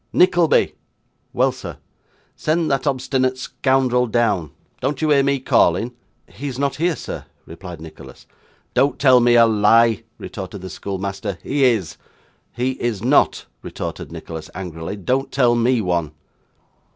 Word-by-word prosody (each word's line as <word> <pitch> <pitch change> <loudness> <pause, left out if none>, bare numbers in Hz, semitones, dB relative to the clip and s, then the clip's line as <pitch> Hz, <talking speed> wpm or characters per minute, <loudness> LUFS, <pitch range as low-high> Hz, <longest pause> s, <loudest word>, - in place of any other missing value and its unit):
'Nickleby!' 175 -3 +3 0.6
'Well, - - +2
sir.' - - -9 0.6
'Send 155 0 0
that 135 +1 0
obstinate 130 -1 0
scoundrel 130 -1 +1
down; 105 -8 +1 0.3
don't 135 +1 -2
you 155 -1 +1
hear 140 -1 +5
me 140 0 +1
calling?' 115 -1 +2 0.3
'He 145 - -8
is 130 -3 -5
not 140 0 -1
here, 170 +1 +1
sir,' - - -7 0.2
replied 85 0 -9
Nicholas. 80 -1 -12 0.5
'Don't 140 - +2
tell 130 -3 +6
me 120 0 +4
a 115 -1 +7
lie,' 115 +1 +4 0.2
retorted 95 -1 -7
the 95 -1 -7
schoolmaster. 100 +1 -4
'He 140 0 +1
is.' 110 - +1 0.5
'He 125 +2 -1
is 115 -4 -2
not,' 135 +4 +3 0.2
retorted - - -6
Nicholas 80 -1 -8
angrily, 90 -1 -6
'don't 130 +8 -1
tell 125 -3 +3
me 120 0 +2
one. 85 -5 -1
120 Hz, 140 wpm, -20 LUFS, 95-135 Hz, 0.6 s, a